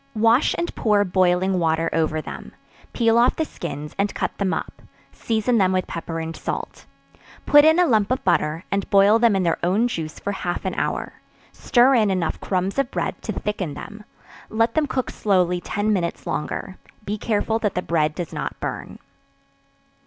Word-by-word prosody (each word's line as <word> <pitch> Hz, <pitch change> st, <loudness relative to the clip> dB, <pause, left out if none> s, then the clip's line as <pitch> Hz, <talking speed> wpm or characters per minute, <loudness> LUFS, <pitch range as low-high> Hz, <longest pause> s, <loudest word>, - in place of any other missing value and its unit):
Wash 230 Hz, +5 st, +3 dB
and 345 Hz, -, -2 dB
pour 210 Hz, -2 st, +2 dB
boiling 185 Hz, 0 st, +2 dB
water 165 Hz, 0 st, +1 dB
over 155 Hz, -1 st, 0 dB
them; -, -, -9 dB, 0.4 s
peel 230 Hz, -1 st, +3 dB
off 240 Hz, -, +4 dB
the 320 Hz, -, -1 dB
skins, 150 Hz, -, -7 dB
and 200 Hz, +1 st, 0 dB
cut -, -, -2 dB
them 195 Hz, -2 st, 0 dB
up; -, -, -5 dB, 0.3 s
season 230 Hz, +1 st, 0 dB
them 190 Hz, -1 st, +3 dB
with 185 Hz, -1 st, 0 dB
pepper 165 Hz, 0 st, -5 dB
and 165 Hz, 0 st, -5 dB
salt; -, -, -6 dB, 0.6 s
put 290 Hz, 0 st, +7 dB
in 315 Hz, +2 st, +5 dB
a 360 Hz, -, +5 dB
lump 215 Hz, -8 st, +2 dB
of 255 Hz, +1 st, -1 dB
butter, 165 Hz, -2 st, +1 dB
and 200 Hz, -1 st, -1 dB
boil 200 Hz, +3 st, +5 dB
them 230 Hz, -3 st, +4 dB
in 190 Hz, -, +1 dB
their 165 Hz, -2 st, 0 dB
own 200 Hz, +7 st, +2 dB
juice 160 Hz, -9 st, -5 dB
for 200 Hz, -, -3 dB
half 180 Hz, -2 st, -4 dB
an 190 Hz, -, -1 dB
hour; -, -, -3 dB, 0.3 s
stir 250 Hz, +2 st, +3 dB
in 220 Hz, -5 st, +3 dB
enough 185 Hz, -4 st, -1 dB
crumbs 190 Hz, +5 st, -1 dB
of 275 Hz, -3 st, +1 dB
bread -, -, -3 dB
to -, -, -4 dB
thicken 190 Hz, -8 st, -3 dB
them; 210 Hz, +1 st, -9 dB, 0.5 s
let 230 Hz, +1 st, +1 dB
them 310 Hz, -2 st, +1 dB
cook 260 Hz, -2 st, -2 dB
slowly 180 Hz, -3 st, +1 dB
ten 205 Hz, +3 st, -1 dB
minutes 175 Hz, -4 st, -2 dB
longer; 185 Hz, +5 st, -4 dB, 0.3 s
be 205 Hz, -, -2 dB
careful 220 Hz, +1 st, -1 dB
that 210 Hz, -4 st, -1 dB
the 180 Hz, -, 0 dB
bread 155 Hz, -2 st, 0 dB
does 175 Hz, -4 st, -5 dB
not -, -, -5 dB
burn. -, -, -5 dB
200 Hz, 185 wpm, -22 LUFS, 175-225 Hz, 0.6 s, put